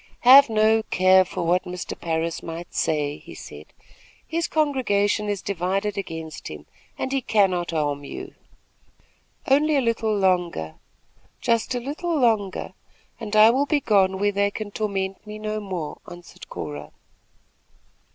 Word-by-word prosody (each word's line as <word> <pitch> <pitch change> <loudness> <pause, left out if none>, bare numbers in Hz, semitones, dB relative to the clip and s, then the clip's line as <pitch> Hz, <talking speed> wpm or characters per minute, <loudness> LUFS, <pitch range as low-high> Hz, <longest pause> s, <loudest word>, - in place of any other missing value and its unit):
"Have 265 +2 +8
no 220 0 +3
care 185 -2 +4
for 180 0 -5
what 175 +2 +1
Mr. 180 0 -6
Parris 165 0 -2
may 165 +1 -6
say," 150 -2 -1
he - - -12
said. - - -11 0.6
"His 335 +1 -2
congregation 210 -9 +1
is 205 -2 -3
divided 195 +2 -1
against 160 -5 -6
him, 75 -1 -9 0.3
and 265 - -3
he 270 -1 0
cannot 190 -7 +1
harm 145 -3 -1
you." - - -8 1.1
"Only 295 +3 +3
a - - +4
little 225 -3 0
longer, 175 - 0 0.7
just 230 +2 0
a - - 0
little 305 +6 -3
longer, 215 -6 0 0.5
and 215 -2 -4
I 215 +1 +8
will 275 +4 +1
be 295 +1 +2
gone 195 -6 +2
where 205 +1 +1
they 200 0 +1
can 205 0 -6
torment 195 -1 -3
me 210 0 -7
no 215 0 -3
more," 185 -7 -5
answered 175 0 -12
Cora. 75 0 -7
200 Hz, 145 wpm, -24 LUFS, 175-225 Hz, 1.1 s, Have